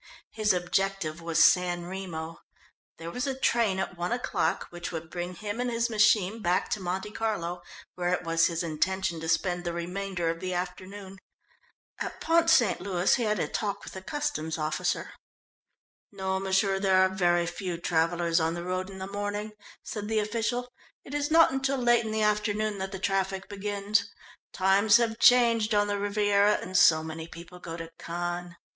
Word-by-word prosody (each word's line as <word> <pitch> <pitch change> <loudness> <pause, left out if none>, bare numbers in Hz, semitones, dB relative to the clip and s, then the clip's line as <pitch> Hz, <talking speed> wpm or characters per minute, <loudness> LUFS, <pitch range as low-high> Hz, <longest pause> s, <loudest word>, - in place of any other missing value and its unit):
His 215 -1 +1
objective 180 -2 -1
was 165 -1 +3
San 175 -1 +3
Remo. 170 -3 -6 0.6
There 165 +1 -7
was 250 +7 -3
a 265 -1 -2
train 230 -7 +2
at 190 -1 -3
one 175 +1 -2
o'clock 245 +1 -1
which 175 0 -6
would 165 -1 -6
bring 175 +1 -4
him 210 +5 -4
and 250 - -1
his 235 0 0
machine 215 0 +3
back 180 -1 +1
to - - 0
Monte 190 +3 -3
Carlo, 180 -6 -2 0.3
where 175 0 -2
it 180 - 0
was 165 0 +3
his 170 0 -2
intention 170 +2 -1
to 160 0 -5
spend 175 0 0
the 170 -1 -3
remainder 175 0 -2
of 165 - -7
the 185 0 -3
afternoon. 190 +2 -6 0.8
At - - -5
Pont 330 0 +3
St. 250 -11 +4
Louis 185 -2 +1
he 240 - +1
had 210 0 +1
had 155 -4 -1
a - - -18
talk 200 -2 -2
with - - -9
the 190 - -7
Customs 190 - -3
Officer. 165 +4 -2 1.0
"No, 190 -1 -2
m'sieur, 195 0 +1
there 190 -1 +3
are 190 - +6
very 175 -2 +2
few 175 0 -4
travellers 170 0 +1
on 165 +1 0
the 170 - -5
road 185 +1 -2
in 190 - -9
the 190 - -5
morning," 205 +2 -4 0.3
said 210 -2 -5
the 220 0 0
official. 230 +3 -1 0.4
"It 275 - -9
is 290 0 -1
not 325 -1 +6
until 270 +1 0
late 240 -1 +3
in 220 - -4
the 220 0 0
afternoon 210 0 0
that 190 0 -4
the 195 - -5
traffic 190 0 -1
begins. 205 +1 -1 0.4
Times 200 +3 +4
have 230 -1 -1
changed 230 -3 +5
on 205 0 +4
the 205 0 -2
Riviera, 205 0 +3
and 185 -2 -4
so 155 -4 +6
many 160 0 -6
people 170 +1 -11
go 165 -1 -7
to 165 -1 -8
Cannes. 175 0 -4
190 Hz, 185 wpm, -28 LUFS, 175-210 Hz, 1.0 s, are